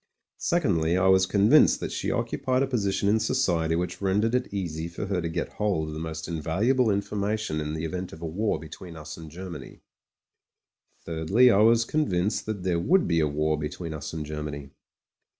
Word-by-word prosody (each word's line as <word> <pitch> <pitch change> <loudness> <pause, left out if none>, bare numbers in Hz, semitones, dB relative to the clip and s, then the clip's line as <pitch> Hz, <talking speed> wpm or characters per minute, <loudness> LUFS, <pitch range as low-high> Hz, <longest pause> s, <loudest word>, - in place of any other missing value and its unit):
Secondly, 90 - +1
I 90 - +2
was 95 0 +5
convinced 100 +2 +5
that - - -4
she - - -2
occupied 130 +1 0
a - - 0
posi 110 -7 0
tion 100 - 0
in 110 +2 +3
society 85 -10 +1
which 90 +2 -3
rendered 105 +4 +1
it 125 0 0
easy 85 -5 -3
for 85 +4 -5
her 95 -3 -1
to 85 - -3
get 85 +1 -3
hold 95 -7 -1
of - - -6
the 75 - -5
most 80 0 -5
invaluable 100 - +1
information 100 -4 -1
in 75 +1 -3
the 80 +1 -3
event 90 +2 -4
of 80 - -10
a - - -2
war 100 +7 -1
between 80 +2 -10
us 75 -2 -8
and 80 -1 -10
Germany. 90 +2 -9 1.2
Thirdly, 95 +10 +4
I 100 - +4
was 115 +2 +5
convinced 105 -10 0
that 105 -4 -4
there 90 -2 +1
would 180 - +3
be 85 -1 +2
a 75 - +2
war 75 +1 0
between 80 +2 -5
us 75 -1 -6
and 80 -2 -5
Germany. 75 -2 -6
90 Hz, 195 wpm, -26 LUFS, 80-105 Hz, 1.2 s, was